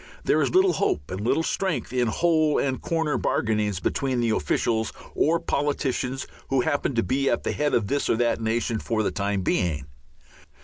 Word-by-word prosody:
There - - +2
is - - +2
little 375 0 +5
hope 70 - -1
and 95 +2 -4
little 125 +9 +1
strength 185 -7 -2
in 125 -2 +2
hole 155 +4 +2
and 130 -2 -1
corner 160 -4 0
bargainings 105 -4 0
between 130 +4 -1
the 115 -1 +1
officials 110 0 0 0.2
or 165 +3 +2
politicians 140 -4 -1 0.2
who 135 -1 +2
happen 140 0 0
to 115 - +2
be 135 +9 +1
at - - 0
the - - -1
head 150 -1 0
of 110 - +1
this 140 +7 -1
or - - +3
that 120 0 +1
nation 115 0 0
for 110 0 -1
the - - 0
time 100 -1 -1
being. 80 -7 0
125 Hz, 185 wpm, -25 LUFS, 110-145 Hz, 0.2 s, little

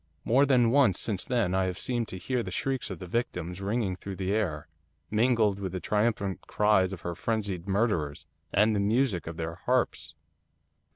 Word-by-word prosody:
More 135 +5 +4
than 125 -4 +4
once 130 -9 +4
since 100 -5 -1
then 115 -9 0
I 95 0 +2
have 90 0 -3
seemed 120 -1 -2
to 95 - -7
hear 125 +7 -1
the - - -5
shrieks 135 -2 -2
of - - -5
the 95 - -8
victims 90 -4 -3
ringing 100 -1 -1
through 95 +1 -7
the 95 +1 -1
air, 85 -8 -1 0.4
mingled 110 -3 +3
with 95 -2 -4
the 90 - -2
triumphant 105 -1 0
cries 105 -3 +3
of 95 - -7
her 85 - -3
frenzied 100 -3 -2
murderers, 95 -9 0 0.3
and 105 +1 +3
the - - +1
music 105 - +1
of 85 0 -6
their 80 0 -3
harps. 80 - 0
100 Hz, 185 wpm, -28 LUFS, 90-115 Hz, 0.4 s, More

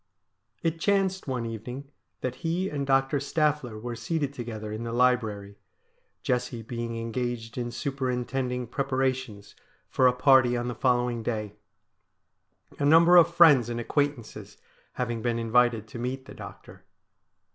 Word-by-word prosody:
It 165 0 -1
chanced 190 -1 +1
one 125 -3 -2
evening 125 +5 -7 0.3
that 130 0 -3
he 170 +6 -1
and 140 -2 -3
Doctor 135 +1 +2
Staffler 140 -5 -1
were 120 +1 -5
seated 140 +4 -2
together 110 -4 -6
in 110 +1 -5
the 115 0 -4
library, 110 -5 0 0.6
Jessie 125 -3 -2
being 115 0 -5
engaged 115 0 -4
in 120 -1 -3
superintending 125 -1 -2
preparations 130 -5 -2 0.3
for 130 - +3
a 125 - +4
party 125 -1 +4
on 120 +1 -2
the - - -3
following 120 -1 +1
day 110 -3 -3 0.6
— - - -29
a - - -1
number 165 +4 +6
of 170 -1 +7
friends 150 -9 +6
and 120 0 -3
acquaintances 140 -1 -3 0.4
having 120 -2 -3
been 120 0 0
invited 115 -1 +2
to 120 - -8
meet 130 +2 -4
the - - -11
doctor. - - -12
125 Hz, 145 wpm, -27 LUFS, 115-140 Hz, 0.6 s, of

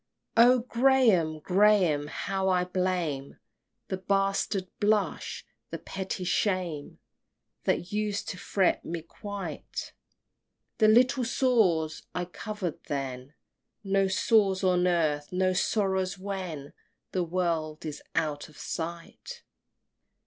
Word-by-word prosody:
XXIV. 230 +1 +8
O 250 0 +5
Graham, 235 -11 +3
Graham, 185 -6 +3
how 190 +4 -2
I 180 -1 +3
blame 180 -6 -2 0.5
The 190 - -1
bastard 195 0 0
blush, 210 -1 0 0.2
the - - -4
petty 190 -1 -5
shame, 180 -5 -1 0.7
That 175 - 0
used 210 -1 -1
to 180 - -6
fret 190 -1 +1
me 165 -1 -5
quite, 200 +4 -6 0.9
The 215 - +6
little 250 +4 +5
sores 215 -11 +2
I 180 0 -1
cover'd 185 -1 -5
then, 135 0 -4 0.5
No 195 -1 +2
sores 195 0 +2
on 180 -1 +3
earth, 155 -4 +1
nor 185 0 +1
sorrows 190 -1 0
when 185 -7 -5 0.4
The 185 - 0
world 165 -3 -2
is 150 -2 -5
out 150 -2 -1
of 155 - -18
sight! 170 - -6
185 Hz, 110 wpm, -28 LUFS, 165-205 Hz, 0.9 s, XXIV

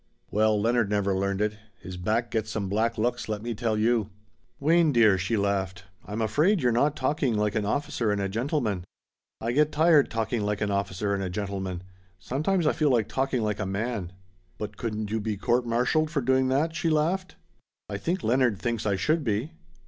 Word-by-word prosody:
"Well, 110 0 +3
Leonard 115 0 +2
never 100 -1 +1
learned 100 +1 -1
it. 105 0 -1 0.2
His 95 - -8
back 110 +6 -1
gets 110 -1 -1
some 105 -3 -2
black 110 +4 0
looks, 120 +1 -1
let 105 -1 -3
me 120 0 -2
tell 110 -1 -1
you." 110 -1 +2 0.5
"Wayne 160 +2 +4
dear," 115 -6 +5
she 95 +5 0
laughed, 95 -2 -1 0.2
"I'm 105 +2 -3
afraid 160 - +2
you're 125 -5 +2
not 140 +6 +2
talking 140 -6 0
like 105 0 +1
an 105 -2 -1
officer 120 -3 -1
and 105 - 0
a 100 - 0
gentleman." 115 - -1 0.6
"I 115 - -2
get 150 +4 +3
tired 155 -2 +4
talking 115 0 -1
like 105 0 -1
an 105 -1 -1
officer 100 0 -1
and 100 - -1
a 95 - -2
gentleman. 95 -2 -4 0.3
Sometimes 155 - -1
I 155 - +3
feel 150 -2 +2
like 115 -5 +2
talking 130 -3 0
like 105 -1 -1
a - - -1
man." 100 -2 -3 0.5
"But 105 -1 -5
couldn't 110 -2 -4
you 110 - 0
be 105 -1 -2
court 120 +5 +1
martialed 125 +7 +1
for 150 -3 -1
doing 130 +1 +2
that?" 150 +5 +1
she 165 - 0
laughed. 170 +5 0 0.5
"I 100 - -4
think 175 - -2
Leonard 120 -2 +2
thinks 115 -2 -2
I 100 - +2
should 150 - +1
be." 115 +5 -1
110 Hz, 200 wpm, -27 LUFS, 100-130 Hz, 0.6 s, dear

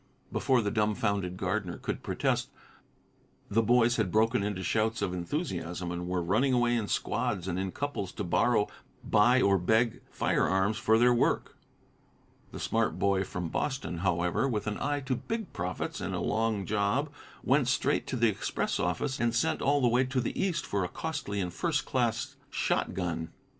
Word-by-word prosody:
Before 130 -4 +2
the 100 - -1
dumfounded 100 -4 0
gardener 95 -1 -2
could - - -4
protest, - - -1 1.0
the 115 +3 +4
boys 120 +1 +3
had 105 -6 0
broken 115 +2 +3
into 100 -2 -2
shouts 110 +4 0
of 90 - -1
enthusiasm, 90 - -3
and 90 0 -4
were 90 -1 -1
running 110 +10 +2
away 120 -1 +3
in 110 -3 -1
squads 115 -7 -1
and 90 0 -1
in 95 0 -2
couples 140 -9 -3
to - - -4
borrow, 105 +4 +2 0.4
buy 120 +5 +4
or 100 -1 +4
beg 110 +6 +2
firearms 95 +3 +1
for 110 0 +4
their 120 +1 +5
work. 120 - +1 1.0
The - - -7
smart 115 0 0
boy 100 -1 +2
from 90 -2 -4
Boston, 135 - -2
however, 90 +6 +1
with 110 -4 -2
an 105 -1 -3
eye 145 0 -1
to 130 -1 -1
big 225 - -4
profits 90 +2 -3
and - - -3
a - - -2
long 110 -2 0
job, 110 +9 0 0.3
went 135 0 +3
straight 135 - +1
to - - -2
the 120 -1 +3
express 105 - -1
office, 130 -2 -1
and 120 -1 +1
sent 120 - +1
all 145 +1 +3
the 125 - +4
way 120 +2 +3
to 130 0 -1
the 120 - -2
East 185 -3 0
for 100 -2 -1
a 90 - -2
costly 105 - -4
and 90 -2 -2
first 155 - 0
class 120 -3 -1
shotgun. 85 -3 -1
110 Hz, 175 wpm, -29 LUFS, 95-125 Hz, 1.0 s, their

